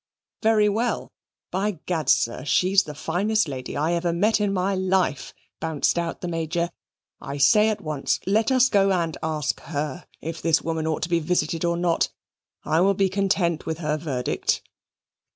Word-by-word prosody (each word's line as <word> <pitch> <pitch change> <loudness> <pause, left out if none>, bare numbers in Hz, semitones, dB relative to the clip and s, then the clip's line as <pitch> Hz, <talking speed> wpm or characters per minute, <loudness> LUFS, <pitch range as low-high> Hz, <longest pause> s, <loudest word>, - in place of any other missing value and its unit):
"Very 220 -1 +4
well? 225 +4 -1 0.4
By 195 +1 -1
Gad, 160 -6 -1
sir, 115 +2 +2
she's 185 +6 +3
the 150 -1 -8
finest 195 +7 0
lady 130 -3 -5
I 160 +4 +1
ever 170 0 0
met 210 +6 +2
in 205 -1 +1
my 190 +1 0
life," 185 -5 0 0.3
bounced 160 -3 0
out 170 -1 -4
the 180 - -3
Major. 170 +1 -2 0.5
"I 140 - -6
say 210 +11 +5
at 210 -1 -2
once, 155 -5 -1
let 220 +6 +2
us 255 0 +5
go 195 -4 +3
and 170 -4 0
ask 155 -2 -1
her 150 +2 -4
if 165 +1 -6
this 165 -1 +2
woman 160 -1 -2
ought 160 -1 -1
to 165 - -2
be 170 -1 +2
visited 165 0 -1
or 170 0 +1
not 175 -1 +1 0.6
I 160 +2 +2
will 195 +1 +3
be 195 0 +2
content 190 -4 0
with 160 -1 -2
her 155 -2 -1
verdict." 145 -5 -1
170 Hz, 175 wpm, -24 LUFS, 155-195 Hz, 0.6 s, say